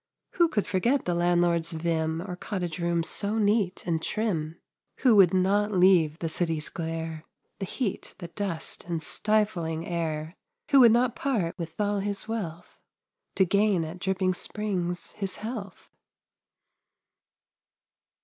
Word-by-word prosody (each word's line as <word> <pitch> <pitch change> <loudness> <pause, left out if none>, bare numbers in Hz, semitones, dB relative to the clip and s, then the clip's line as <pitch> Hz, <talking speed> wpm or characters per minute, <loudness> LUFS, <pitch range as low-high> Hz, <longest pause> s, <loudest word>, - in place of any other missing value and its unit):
Who 340 -1 +4
could 215 -11 -1
forget 235 +8 +1
the 175 - 0
landlord's 175 -1 +2
vim 160 0 -1
Or 180 -2 -5
cottage 180 -3 -4
rooms 170 -1 0
so 205 +2 -1
neat 205 -3 +1
and 165 -2 0
trim? 170 -8 -2 0.4
Who 250 -4 +5
would 185 -4 +7
not 200 +3 +2
leave 180 -5 +4
the 165 - -3
city's 160 -2 -1
glare, 160 -1 -4 0.4
The 195 - -3
heat, 225 -3 -3
the 175 -3 -8
dust, 175 -2 -4
and 170 -2 -3
stifling 190 -7 0
air 160 -2 -3 0.4
Who 275 - +7
would 240 -3 +8
not 240 +1 +2
part 220 -12 -1
with 165 +2 -6
all 205 -1 +1
his 200 +1 -3
wealth 180 -8 -5 0.6
To 190 - +4
gain 200 -2 +2
at 165 +3 -8
Dripping 185 0 0
Springs 180 -3 -3
his 195 -3 -4
health? 215 -2 -7
180 Hz, 140 wpm, -27 LUFS, 165-205 Hz, 0.6 s, would